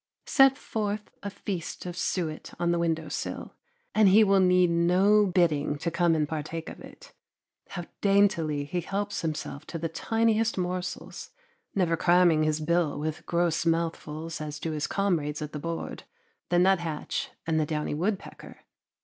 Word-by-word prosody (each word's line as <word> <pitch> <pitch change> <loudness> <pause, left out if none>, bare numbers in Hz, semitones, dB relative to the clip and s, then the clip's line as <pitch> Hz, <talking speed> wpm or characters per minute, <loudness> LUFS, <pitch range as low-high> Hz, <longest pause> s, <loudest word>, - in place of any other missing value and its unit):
Set 270 -1 +5
forth 210 -1 -3
a 200 - -4
feast 190 -4 -5
of 175 -1 -5
suet 165 -3 -3
on 175 0 +1
the 170 - +1
window 160 -2 0
sill, - - -5 0.4
and 215 -2 +5
he 210 +4 +7
will 195 -1 +4
need 180 -1 +4
no 185 +5 +4
bidding 160 -5 +1
to 170 +3 -2
come 170 -1 +2
and 150 -1 +1
partake 160 +1 -5
of - - -10
it. - - -14 0.6
How 175 -2 -5 0.2
daintily 190 -8 +2
he 175 +4 -2
helps 200 +3 -3
himself 155 -2 -4
to 170 - -5
the 165 0 -2
tiniest 225 +5 +1
morsels, 180 0 -4 0.5
never 175 -4 +2
cramming 175 -2 +4
his 155 0 +1
bill 170 -1 +1
with 155 +1 -4
gross 170 -1 +1
mouthfuls 165 -1 -2
as 150 -1 -5
do 165 - -3
his 150 -1 -2
comrades 165 -7 0
at 150 -1 -6
the 150 - -4
board, 165 +2 -5 0.5
the 175 - +2
nuthatch 170 -4 +1 0.2
and 160 -1 +1
the 155 - +1
downy 150 -1 -2
woodpecker! 190 +6 -4
170 Hz, 160 wpm, -27 LUFS, 155-190 Hz, 0.6 s, he